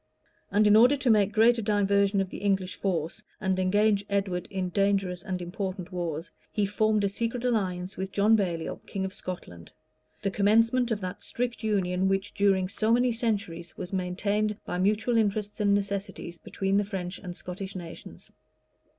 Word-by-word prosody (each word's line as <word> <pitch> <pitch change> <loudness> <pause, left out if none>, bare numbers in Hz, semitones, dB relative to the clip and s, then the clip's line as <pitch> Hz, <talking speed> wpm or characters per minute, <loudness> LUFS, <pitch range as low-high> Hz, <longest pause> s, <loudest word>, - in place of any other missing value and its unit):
And 210 +1 +3
in 210 0 +6
order 245 +6 +7
to 265 -4 +2
make 210 -2 +4
a - - -17
greater 230 +2 +4
diversion 200 -1 +2
of 190 - -4
the - - -6
English 195 -2 0
force, 175 0 -2 0.2
and 190 -1 0
engage 205 +2 +3
Edward 195 -3 -1
in 190 -2 -2
dangerous 195 -2 +1
and 190 -3 -3
important 185 0 -5
wars, 170 -2 -4 0.2
he 210 - +1
formed 215 +1 +1
a - - +3
secret 230 +4 -2
alliance 190 -6 -1
with 190 0 -4
John 210 +2 +4
Baliol, 175 -6 -1
king 190 -1 -3
of 190 - -5
Scotland; 85 - -8 0.5
the 195 - 0
commencement 230 +5 +3
of 215 -3 -1
that 185 -1 -5
strict 240 -1 -3
union 190 -3 +1
which, 195 +1 -1
during 195 -2 +2
so 215 +3 0
many 245 +1 +4
centuries, 200 -8 -2
was 180 - -6
maintained, 200 +3 0
by 180 - -3
mutual 215 +5 +2
interests 210 -1 0
and 205 -1 +3
necessities, 200 -3 -3
between 195 0 -1
the 205 - +3
French 190 -3 -5
and 180 -3 -7
Scottish 190 +2 -7
nations. 170 -3 -9
200 Hz, 175 wpm, -28 LUFS, 185-215 Hz, 0.5 s, order